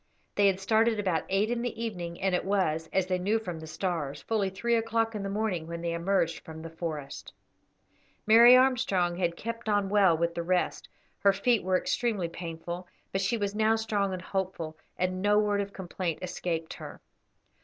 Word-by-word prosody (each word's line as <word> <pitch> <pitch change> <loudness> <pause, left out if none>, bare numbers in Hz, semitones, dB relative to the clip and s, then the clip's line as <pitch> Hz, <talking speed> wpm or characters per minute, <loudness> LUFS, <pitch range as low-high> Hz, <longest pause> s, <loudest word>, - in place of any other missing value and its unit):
They 205 -1 +4
had 190 -1 +2
started 220 +2 +2
about 185 -5 0
eight 200 +4 +1
in 240 -1 -1
the 240 -2 -4
evening, 175 -7 -4
and 190 -1 +1
it 180 - +1
was, 165 -5 0
as 190 -1 +2
they 185 0 -1
knew 205 +5 +1
from 180 -7 -5
the 160 - -9
stars, 155 -3 -3
fully 210 -4 0
three 235 +5 -1
o'clock 225 0 +1
in 210 - -4
the 195 - -3
morning 195 -5 -1
when 170 0 -5
they 170 -1 -1
emerged 170 -1 0
from 160 0 -9
the 165 - -7
forest. 155 -4 -6 0.9
Mary 235 +3 +9
Armstrong 235 -10 +2
had 170 -2 0
kept 230 0 -5
on 205 -2 +2
well 195 -5 +4
with 170 +1 0
the 170 - -3
rest; 180 +1 -1 0.3
her 200 - +5
feet 225 +3 +2
were 185 0 +2
extremely 215 -4 -1
painful, 170 +1 -6 0.2
but 195 - 0
she 195 +5 +1
was 205 -2 -2
now 220 +1 +3
strong 210 -3 0
and 185 -1 -5
hopeful, 185 -5 -3 0.2
and 185 0 -1
no 205 +1 +3
word 205 -1 +2
of 200 0 -5
complaint 180 -3 -4
escaped 165 -2 -3
her. - - -9
190 Hz, 195 wpm, -29 LUFS, 170-215 Hz, 0.9 s, Mary